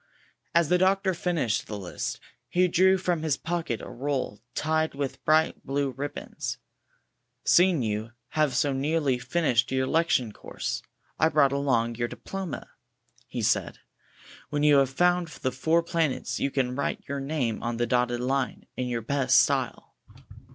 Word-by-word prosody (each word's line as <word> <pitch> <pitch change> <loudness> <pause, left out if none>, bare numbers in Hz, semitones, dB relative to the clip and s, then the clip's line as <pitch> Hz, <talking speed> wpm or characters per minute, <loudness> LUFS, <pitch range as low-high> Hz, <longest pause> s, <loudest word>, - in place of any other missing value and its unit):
As 170 -3 +4
the 180 - +4
doctor 190 +1 +3
finished 165 -11 -1
the 105 - -5
list, 95 -3 -4 0.3
he 180 +1 +3
drew 190 +2 +4
from 175 -3 -1
his 155 -3 0
pocket 165 -8 -2
a - - -7
roll 130 -5 -3
tied 155 0 0
with 140 -1 -4
bright 155 +1 +3
blue 140 0 -1
rib 140 +3 -5
bons. - - -5 0.9
''Seeing 175 -6 +5
you 110 0 -2 0.2
have 155 -3 +1
so 145 -2 +2
nearly 140 -1 +1
finished 125 -6 +1
your 130 0 +1
lectui'e 130 -7 +1
course, - - -4 0.4
I 160 - +5
brought 145 -3 +4
along 130 -5 +1
your 120 0 0
diploma," 190 +5 -6 0.6
he - - -4
said. - - +1 0.7
''When 145 0 -1
you 150 -1 +6
have 135 -2 +4
found 175 +5 +2
the 130 -4 -3
four 160 +6 +2
planets, 165 -5 -1
you 140 - +1
can 130 -2 -1
write 140 - -3
your 140 0 -3
name 135 -5 -2
on 120 -1 -2
the 120 - +1
dotted 120 0 +1
line, 130 +1 -1
in 125 - -2
your 120 -1 -2
best 140 +2 +4
style." - - 0
140 Hz, 160 wpm, -27 LUFS, 125-165 Hz, 0.9 s, you